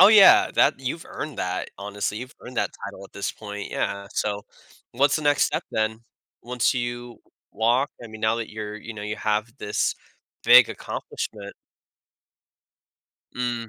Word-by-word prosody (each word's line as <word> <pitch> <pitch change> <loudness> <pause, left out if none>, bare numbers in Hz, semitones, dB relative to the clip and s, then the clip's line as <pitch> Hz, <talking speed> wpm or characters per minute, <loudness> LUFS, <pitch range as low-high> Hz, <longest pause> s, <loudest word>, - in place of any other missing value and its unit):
Oh, 190 - +11
yeah, 210 -3 +8
that - - +5
you've - - -4
earned - - -6
that, - - -2
honestly, 105 +1 -3
you've 125 +1 -8
earned 125 - -10
that - - +1
title 100 - -7
at - - -15
this 100 - -3
point, 105 -1 -7
yeah, 100 0 -2
so, 105 -1 -1 0.5
what's 140 +4 +3
the 155 - -3
next 145 -1 +3
step - - -1
then 110 0 0 0.4
once 125 0 +1
you 120 -1 -4 0.3
walk? 120 +5 +2
I 120 - -7
mean, 110 0 -10
now 110 +1 +2
that 115 -1 -4
you're 105 -1 -5
you 115 +2 -8
know, 105 - -7
you 105 +1 -3
have 110 +1 0
this 105 - 0 0.5
big - - +9
accomplishment. 100 -2 -6 1.8
Mm. 120 -2 -2
110 Hz, 160 wpm, -25 LUFS, 105-125 Hz, 1.8 s, Oh